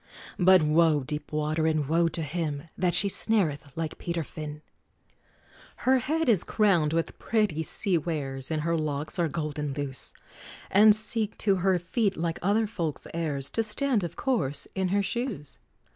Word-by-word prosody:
But 185 -1 +6
woe, 155 0 +3
deep 150 +2 -5
water 155 +1 0
and 155 -3 0
woe 165 +2 +3
to 165 0 -2
him, 150 -2 -3
That 180 -2 +1
she 195 +3 +6
snareth 180 -9 0
like 160 -1 -4
Peter 170 -1 -2
Fin! 150 0 -8 1.2
Her 260 +1 +5
head 315 +5 -1
is 210 -8 +3
crowned 175 -8 +2
with 165 0 -2
pretty 210 -8 0
sea 175 +2 0
wares, 135 -5 -3
And 155 -2 -1
her 170 +1 +1
locks 155 0 -3
are 170 - +2
golden 150 -2 -3
loose, 135 -2 -4 0.6
And 210 +2 +7
seek 220 0 0
to 195 -2 +4
her 185 0 +2
feet, 195 +4 -1
like 165 0 -2
other 205 +5 +2
folks' 170 -8 -4
heirs, 150 -5 -2
To 225 - +1
stand, 225 0 +1
of 170 - -5
course, 205 - 0
in 190 -1 0
her 200 +2 +1
shoes! 235 - -3
170 Hz, 165 wpm, -27 LUFS, 150-200 Hz, 1.2 s, And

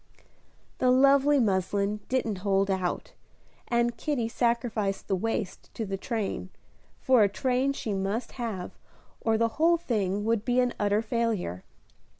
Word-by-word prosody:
The 255 - +3
lovely 275 +2 +5
muslin 200 -1 0
didn't 230 -6 0
hold 195 0 +1
out, 185 -2 -2 0.5
and 235 0 +1
Kitty 245 -2 -1
sacrificed 230 -4 -1
the 195 - +1
waist 220 0 -3
to 225 - -3
the 195 -1 -3
train, 200 -3 -3 0.5
for 255 -3 +4
a 205 - +5
train 255 +5 0
she 220 -6 -3
must 200 +5 -2
have 220 -8 -4 0.5
or 225 -1 +1
the 230 +1 +2
whole 340 +1 +5
thing 205 - -1
would 225 -2 +1
be 245 +1 +1
an 250 -1 +2
utter 205 +1 +2
failure. 215 - -1
225 Hz, 145 wpm, -28 LUFS, 200-245 Hz, 0.5 s, lovely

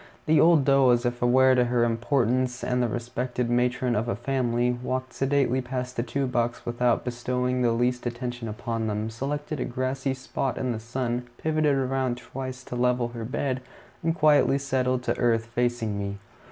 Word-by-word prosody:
The 155 0 +4
old 160 -4 +5
doe, 135 -2 +5
as 120 0 +3
if 120 0 -2
aware 130 +2 +5
of 125 -1 +3
her 120 -1 +2
importance 125 +1 +1
as 125 0 0
the 120 - +2
respected 120 +1 -3
matron 125 0 +1
of 110 +3 0
a 120 - 0
family, 120 0 0
walked 130 0 -3
sedately 135 -1 +1
past 125 0 -4
the - - 0
two 135 +3 -2
bucks 120 -2 -1
without 120 0 +1
bestowing 125 +1 -1
the 120 -1 +3
least 125 +1 0
attention 120 -1 -4
upon 115 +1 -3
them, 105 +1 -2
selected 145 +5 -4
a - - -1
grassy 130 +2 -2
spot 130 0 -3
in 130 -1 -1
the 110 - -3
sun, 120 +1 -3
pivoted 155 -2 +1
around 130 -2 0
twice 130 0 -7
to 125 - -7
level 125 -1 +1
her 120 -1 -6
bed, 130 +2 -2 0.4
and 165 0 0
quietly 150 -3 +4
settled 130 -2 0
to - - 0
earth, 115 -2 +2
facing 120 -3 -1
me. 100 0 -4
125 Hz, 180 wpm, -26 LUFS, 120-130 Hz, 0.4 s, old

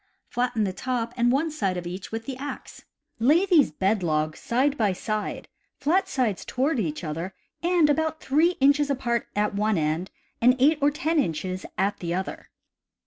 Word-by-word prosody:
Flatten 245 -2 0
the 190 -2 -1
top 240 +3 -2
and 240 0 +3
one 305 +5 +1
side 195 -12 -1
of 175 - -5
each 185 +3 -6
with 225 0 -4
the 265 - -4
axe. 280 +2 -8 0.3
Lay 300 - +4
these 340 -8 +5
bed 190 +6 0
logs 155 -2 -1
side 265 +4 +1
by 210 -7 +1
side, 215 +3 -3 0.3
flat 370 +7 +1
sides 245 - 0
toward 270 +1 0
each 160 -5 -2
other, 165 +4 -4 0.3
and 345 -2 +3
about 315 +1 0
3 315 +6 +2
inches 285 +1 +4
apart 240 -4 -1
at 210 0 +1
one 210 0 +1
end 160 +4 -1 0.3
and 250 +2 +6
8 295 +4 +4
or 285 - +5
10 310 +2 0
inches 185 - -2
at 200 +2 0
the 170 -1 -2
other. 190 +1 -5
235 Hz, 180 wpm, -25 LUFS, 190-290 Hz, 0.3 s, and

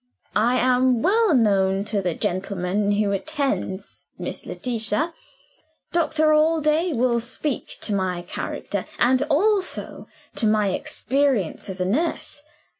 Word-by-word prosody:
I 240 +4 +3
am 255 -1 +3
well 420 -3 +4
known 195 -4 +2
to 205 -1 -1
the 180 -3 -1
gentleman 195 +2 -1
who 205 0 +1
attends 200 - -3
Miss 175 - -5
Letitia. 225 - -1 0.8
Dr. 315 -2 +2
Allday 310 +2 +3
will 240 -3 +2
speak 255 +4 -3
to 210 - -1
my 185 -3 -1
character 175 - -4
and 255 +1 +3
also 390 +4 0 0.3
to 220 - +2
my 210 -2 +3
experience 255 - 0
as 190 0 -4
a 180 - 0
nurse. 290 - -1
235 Hz, 120 wpm, -23 LUFS, 195-300 Hz, 0.8 s, well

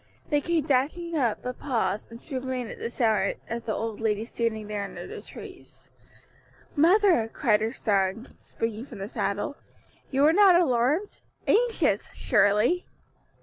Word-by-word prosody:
They 295 -1 +3
came 330 -2 0
dashing 315 +5 0
up, 240 -8 0
but 250 0 -5
paused 215 -7 -1
and 230 0 -10
drew 270 -1 -5
rein 255 -1 -3
again - - -9
at 230 - -3
sight 220 -5 +1
of 235 0 -5
the 215 - -1
old 225 -1 -4
lady 220 -1 0
standing 230 -2 -2
there 205 -1 -3
under 200 - -7
the - - -8
trees. - - -12 0.8
"Mother," 340 - +4
cried 215 -5 +2
her 220 +1 0
son, 205 -1 0
springing 225 +2 -4
from 235 - -10
the 195 0 -5
saddle, 205 +6 -2 0.5
"you 270 +1 +2
were 310 +2 +6
not 390 -1 +7
alarmed? 295 - +1 0.2
anxious? 415 - +2
surely." 210 - +2
235 Hz, 155 wpm, -26 LUFS, 215-295 Hz, 0.8 s, not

